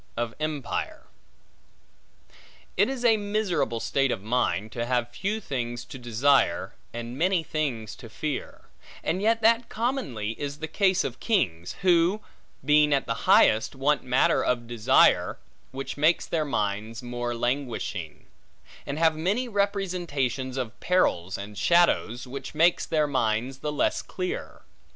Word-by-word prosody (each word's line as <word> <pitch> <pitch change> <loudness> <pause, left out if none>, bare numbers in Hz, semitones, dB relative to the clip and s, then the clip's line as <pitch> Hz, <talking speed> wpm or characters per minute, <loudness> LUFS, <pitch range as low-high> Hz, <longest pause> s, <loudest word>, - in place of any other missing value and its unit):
Of 120 -1 -2
Empire 155 -4 -3 1.7
IT 205 +6 +3
IS 260 -2 -3
a 225 -2 +5
miserable 205 - -1
state 135 +3 +1
of 95 - -3
mind, 110 -2 0
to 120 -1 -3
have 120 -1 0
few 210 - -2
things 120 - -4
to 130 - -9
desire, 120 -3 +2 0.2
and 120 +2 -6
many 180 0 +2
things 135 -9 -3
to 115 - -11
fear; 150 +4 -5 0.4
and 185 - -1
yet 225 +1 +2
that 230 +1 +4
commonly 220 - -2
is 145 0 -4
the 160 +1 -5
case 190 +3 +2
of - - -5
kings; 90 - 0
who, 180 +2 +4 0.5
being 150 0 +5
at 135 - -1
the - - -1 0.2
highest, 110 +5 +5
want 140 +2 +1
matter 125 +1 +2
of 120 -1 0
desire, 115 -2 +3 0.3
which 135 +2 -6
makes 155 +4 +3
their 160 -2 -1
minds 110 -1 -2
more 120 0 -3
languishing; 120 - -3 0.6
and 140 - -3
have 160 -1 +3
many 200 +11 0
representations 175 - -1
of 125 -3 -4
perils 95 - +1
and 100 0 -8
shadows, 170 -8 +3
which 135 +2 -7
makes 170 +3 +3
their 155 -2 +2
minds 130 -1 -1
the 150 - -3
less 150 - 0
clear. 370 +7 -5
140 Hz, 140 wpm, -26 LUFS, 120-180 Hz, 1.7 s, a